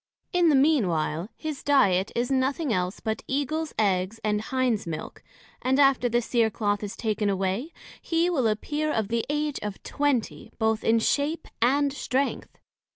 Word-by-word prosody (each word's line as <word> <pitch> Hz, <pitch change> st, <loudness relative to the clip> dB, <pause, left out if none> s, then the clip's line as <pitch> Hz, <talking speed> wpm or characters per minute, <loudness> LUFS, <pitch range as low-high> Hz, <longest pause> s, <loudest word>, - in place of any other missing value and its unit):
In 350 Hz, -2 st, +4 dB
the 295 Hz, -, +4 dB
mean 275 Hz, -5 st, +4 dB
while, 165 Hz, +2 st, -1 dB
his 305 Hz, -3 st, -5 dB
diet 200 Hz, -10 st, +3 dB
is 240 Hz, +2 st, 0 dB
nothing 270 Hz, +1 st, +1 dB
else 180 Hz, 0 st, -1 dB
but 220 Hz, -1 st, -3 dB
Eagles 300 Hz, +3 st, -1 dB
eggs, 195 Hz, 0 st, +1 dB
and 210 Hz, -1 st, +1 dB
Hinds 255 Hz, -, -1 dB
milk; 160 Hz, -2 st, -6 dB, 0.4 s
and 265 Hz, +2 st, +1 dB
after 270 Hz, -3 st, +4 dB
the 240 Hz, +1 st, +1 dB
Cere 230 Hz, -1 st, +2 dB
cloth 205 Hz, -1 st, -1 dB
is 205 Hz, -1 st, -5 dB
taken 215 Hz, -2 st, -1 dB
away, 195 Hz, -, -1 dB, 0.3 s
he 330 Hz, +1 st, +1 dB
will 285 Hz, -10 st, +1 dB
appear 295 Hz, +8 st, -1 dB
of 220 Hz, -6 st, -1 dB
the 230 Hz, 0 st, 0 dB
age 295 Hz, 0 st, -1 dB
of 210 Hz, -1 st, -6 dB
Twenty, 285 Hz, -6 st, -1 dB
both 220 Hz, -1 st, +1 dB
in 225 Hz, +1 st, +4 dB
shape, 290 Hz, +8 st, 0 dB
and 280 Hz, +3 st, +3 dB
strength. 275 Hz, -1 st, -2 dB
240 Hz, 165 wpm, -26 LUFS, 210-285 Hz, 0.4 s, In